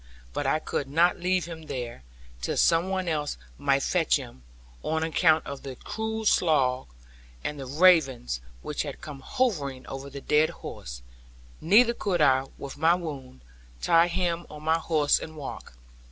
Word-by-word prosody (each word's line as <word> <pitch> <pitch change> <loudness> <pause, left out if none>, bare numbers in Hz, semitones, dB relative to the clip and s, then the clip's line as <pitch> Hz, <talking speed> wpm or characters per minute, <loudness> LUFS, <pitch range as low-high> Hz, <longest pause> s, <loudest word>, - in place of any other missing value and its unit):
But - - -2
I - - +3
could 145 -2 -3
not 170 +6 +3
leave 180 0 +1
him 160 -2 -9
there, 120 - -5 0.4
till - - -2
some 170 +2 +3
one 190 -1 -1
else 150 - -1 0.2
might 140 -1 +2
fetch 170 -4 +2
him; 125 - -6 0.4
on 160 0 -1
account 160 -1 +3
of 140 -1 -6
the 135 -2 -7
cruel 220 - -4
slough, 135 -10 +2 0.6
and 150 - -4
the 135 - -6
ravens 135 - +3 0.2
which - - -3
had - - -5
come 145 -3 -8
hovering 145 - -1
over 135 +1 -7
the 140 0 -7
dead 150 +3 +3 0.2
horse; - - -8 0.6
neither 225 +8 +5
could 195 -6 -1
I, 135 -3 +4
with 140 0 -8
my 165 +2 +5
wound, 140 - -7 0.4
tie 165 - +4
him 175 -1 -1
on 150 0 -10
my 160 +1 +2
horse 155 -3 +2
and 160 - -8
walk. 140 - -8
155 Hz, 165 wpm, -27 LUFS, 135-175 Hz, 0.6 s, neither